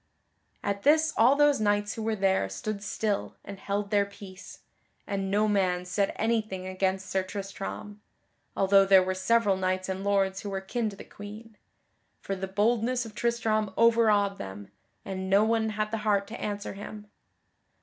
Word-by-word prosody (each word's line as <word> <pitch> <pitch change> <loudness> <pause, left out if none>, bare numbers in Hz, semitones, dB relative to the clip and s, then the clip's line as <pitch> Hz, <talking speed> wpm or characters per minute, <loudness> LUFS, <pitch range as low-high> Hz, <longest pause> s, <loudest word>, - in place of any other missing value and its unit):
At 200 0 -2
this 310 +3 +4
all 245 +5 +5
those 290 -1 +4
knights 205 0 +1
who 225 - -6
were 220 0 -1
there 190 - +1
stood 200 - -4
still 205 0 -2
and 200 -1 -8
held 200 +1 -3
their 205 -1 +4
peace, 195 -1 -12 0.4
and 195 -1 -2
no 210 +2 +2
man 185 -3 +1
said 195 +2 0
anything 215 -4 -1
against 190 0 -1
Sir 190 +1 0
Tristram 200 +1 -7 0.6
(although 195 0 +5
there 195 -1 +6
were 185 0 -1
several 195 +1 +2
knights 185 0 -1
and 190 +1 -3
lords 195 -1 +1
who 205 - -5
were 195 -1 -2
kin 220 +4 -2
to 200 - -10
the - - -10
Queen), 215 +2 -11 0.6
for 195 - -4
the 190 0 -4
boldness 230 +5 +1
of 220 - -10
Tristram 220 -2 0
overawed 215 -4 +4
them, 95 +1 -8 0.3
and 190 -1 -4
no 200 +2 +5
one 220 0 +1
had 215 0 -2
the 225 - -2
heart 205 -2 +1
to 230 - -7
answer 205 -1 -4
him. 210 +1 -9
200 Hz, 170 wpm, -28 LUFS, 190-215 Hz, 0.6 s, there